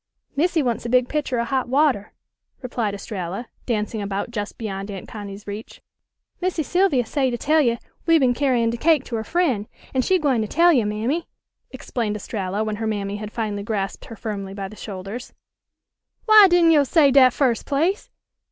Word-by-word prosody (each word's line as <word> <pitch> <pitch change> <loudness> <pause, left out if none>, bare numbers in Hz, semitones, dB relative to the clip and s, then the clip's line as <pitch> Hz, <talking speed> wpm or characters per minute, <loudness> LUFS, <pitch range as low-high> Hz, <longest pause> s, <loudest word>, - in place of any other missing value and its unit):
"Missy 325 +1 +2
wants 240 -3 -1
a 235 - -4
big 250 0 +3
pitcher 290 -4 -2
of 235 0 -1
hot 260 -2 0
water," 265 -7 +2 0.5
replied 230 -5 -2
Estralla, 200 +2 -5 0.2
dancing 215 -2 -1
about 200 +2 -3
just 210 -3 -5
beyond 200 -3 -5
Aunt 195 -2 -7
Connie's 205 -1 -8
reach. 205 +2 -8 0.6
"Missy 355 -3 0
Sylvia 340 -7 +2
say 270 +1 0
to 240 - -2
tell 310 +6 +3
you 235 -4 +2 0.3
we 330 0 +6
been 260 -5 +3
carryin' 245 -3 +1
de 235 - -4
cake 310 +1 +3
to 240 - -5
her 220 - -3
fr'en', 260 - 0 0.3
an' 260 - +2
she 375 +8 +2
gwine 275 -8 +1
to 215 - -2
tell 340 +8 +4
you, 235 -7 +2
Mammy," 235 +11 -2 0.4
explained 225 - -3
Estralla 200 -1 -3
when 215 -1 -3
her 220 0 -2
mammy 205 -1 -2
had 210 0 -7
finally 215 -3 -3
grasped 200 -2 -3
her 225 - -9
firmly 200 -3 -5
by 195 -1 -4
the 215 - -12
shoulders. 200 +4 -7 0.9
"W'y 430 -3 +9
didn' 345 -2 +5
yo' 300 -3 +5
say 285 0 +4
dat 260 -1 +7
firs' 245 -3 +1
place? 330 +8 -1
235 Hz, 190 wpm, -22 LUFS, 210-285 Hz, 0.9 s, W'y